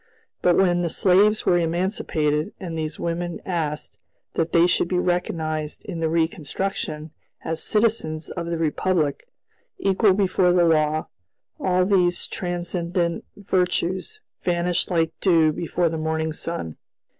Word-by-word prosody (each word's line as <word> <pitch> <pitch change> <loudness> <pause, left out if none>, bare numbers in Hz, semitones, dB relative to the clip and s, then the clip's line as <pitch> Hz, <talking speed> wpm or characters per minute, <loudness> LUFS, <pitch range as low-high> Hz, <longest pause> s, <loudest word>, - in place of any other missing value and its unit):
But 175 -1 +4
when 175 -2 +3
the 170 - 0
slaves 200 +5 +3
were 175 -1 +4
emancipated, 165 -2 0
and 175 -4 -5
these 155 -1 -4
women 170 0 -3
asked 155 -5 -3 0.3
that 165 0 -1
they 170 0 +5
should 175 - +2
be 180 - 0
recognized 160 -4 -2
in 170 - -5
the 160 -1 0
reconstruction 160 -1 -2 0.3
as 160 0 -2
citizens 210 -8 0
of 170 -2 -4
the 170 0 -2
Republic, 160 - 0 0.5
equal 195 +1 +3
before 185 -2 +3
the 175 -1 +4
law, 155 -1 +2 0.5
all 185 -1 +2
these 180 -3 +2
transcendent 175 -1 -2
virtues 185 - -1 0.2
vanished 175 0 0
like 165 -3 +1
dew 165 -5 +4
before 170 +2 -1
the 160 0 -2
morning 160 0 -1
sun. 155 - -5
170 Hz, 135 wpm, -23 LUFS, 160-180 Hz, 0.5 s, they